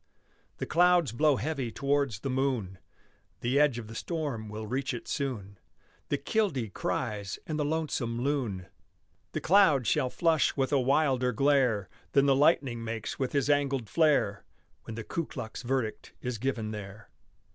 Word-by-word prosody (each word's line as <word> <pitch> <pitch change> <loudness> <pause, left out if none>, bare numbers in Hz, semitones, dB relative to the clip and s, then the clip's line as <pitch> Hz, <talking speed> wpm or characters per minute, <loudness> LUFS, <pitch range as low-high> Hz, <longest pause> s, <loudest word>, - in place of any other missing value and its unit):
The - - -3
clouds 175 -4 +4
blow 150 +4 +3
heavy 140 -5 -2
towards 140 -6 0
the 135 - -3
moon. 125 -9 -1 0.6
The 125 +4 +2
edge 145 -5 +4
of 120 - -5
the 110 - -10
storm 135 -6 -3
will 110 +1 -6
reach 130 +3 -2
it 120 - -8
soon. 110 - -4 0.5
The 145 - +1
killdee 140 - -1
cries 105 -5 -2
and 155 -1 -3
the - - +2
lonesome 145 -6 -1
loon. 120 -9 -1 0.7
The - - -2
clouds 165 - +4
shall 140 -4 +2
flush 160 +1 +2
with 135 0 +1
a 140 - +4
wilder 130 -2 +2
glare 125 -6 +2 0.3
Than 140 0 +5
the 135 -1 +4
lightning 135 -5 +2
makes 110 -1 -4
with 130 -2 -1
his 140 -2 +1
angled 140 -5 +1
flare, 145 -11 +2 0.4
When 115 - -6
the 115 - -5
Ku 165 +8 -3
Klux 115 -4 -7
verdict 125 -3 -2
is 125 -3 -4
given 115 -4 -2
there. 105 0 -9
130 Hz, 160 wpm, -29 LUFS, 115-145 Hz, 0.7 s, Than